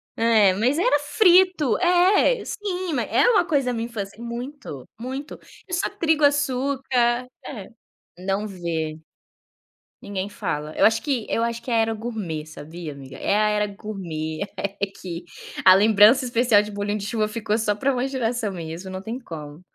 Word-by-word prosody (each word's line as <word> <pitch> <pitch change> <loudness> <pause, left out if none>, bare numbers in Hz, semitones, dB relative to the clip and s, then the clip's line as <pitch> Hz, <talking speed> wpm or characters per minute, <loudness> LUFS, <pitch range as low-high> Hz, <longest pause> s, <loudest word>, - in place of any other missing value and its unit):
É, 220 -4 +4
mas 245 +9 +1
era 295 -4 +3
frito. 360 - +4
É! 365 +7 +4
Sim, 370 -5 -3
ma - - 0
é - - +2
uma 415 -7 +4
coisa 280 -6 +1
da 250 - 0
minha 230 0 -2
infância 210 -1 -7
muito, 235 - -7
muito. 265 +4 -6 0.3
É 360 - -8
só 355 +3 0
trigo, 320 -6 0
açúcar 265 -3 +1 0.2
é. 215 -9 -8 0.5
Não 195 +3 -2
vê. 165 -5 -4 1.0
Ninguém 200 -1 -4
fala. 150 -6 -4
Eu - - +1
acho 220 +1 +4
que 265 -7 -1
eu 230 - 0
acho 235 0 -2
que 245 - -9
é - - +2
a - - +4
era 225 0 +2
gourmet, 210 -9 -5
sabia, 155 +2 -8
amiga. 135 -2 -11
É 200 - 0
a 215 0 +3
era 210 0 +1
gourmet, 170 -7 -6 0.2
é 200 0 -2
que 175 -1 -6 0.4
a 185 - +9
lembrança 215 +5 +6
especial 240 -3 +4
de 210 0 -7
bolinho 205 +1 -2
de 200 - -6
chuva 215 0 0
ficou 215 -1 -2
só 210 -2 0
pra 265 +6 0
uma 250 +2 -1
geração 235 -5 -2
mesmo, 170 +1 -7
não 185 0 -6
tem 225 +4 -5
como. 155 - -9
225 Hz, 175 wpm, -23 LUFS, 195-265 Hz, 1.0 s, a